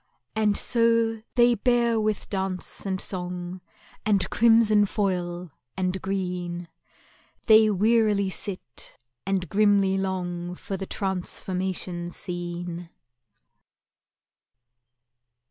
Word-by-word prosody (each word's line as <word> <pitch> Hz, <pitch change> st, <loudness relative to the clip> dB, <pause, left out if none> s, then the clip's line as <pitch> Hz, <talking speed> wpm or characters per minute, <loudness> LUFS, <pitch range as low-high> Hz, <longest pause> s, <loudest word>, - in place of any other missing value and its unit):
And 215 Hz, -2 st, +2 dB
so 230 Hz, -2 st, +2 dB
they 240 Hz, 0 st, +5 dB
bear 235 Hz, 0 st, +2 dB
with 215 Hz, -1 st, -1 dB
dance 190 Hz, 0 st, -3 dB
and 190 Hz, -1 st, -1 dB
song, 180 Hz, -1 st, -4 dB, 0.4 s
And 205 Hz, -3 st, +2 dB
crimson 225 Hz, -3 st, +5 dB
foil 180 Hz, -4 st, -2 dB, 0.3 s
and 185 Hz, 0 st, -1 dB
green, 180 Hz, -3 st, -3 dB, 0.8 s
They 220 Hz, -1 st, +7 dB
wearily 210 Hz, -1 st, +2 dB
sit, 185 Hz, -11 st, -6 dB, 0.3 s
and 190 Hz, -2 st, 0 dB
grimly 200 Hz, 0 st, +3 dB
long 180 Hz, -2 st, -3 dB
For 195 Hz, -, -5 dB
the 190 Hz, 0 st, -5 dB
Transformation 185 Hz, -2 st, -3 dB
Scene. 175 Hz, -1 st, -5 dB
190 Hz, 90 wpm, -25 LUFS, 180-215 Hz, 0.8 s, They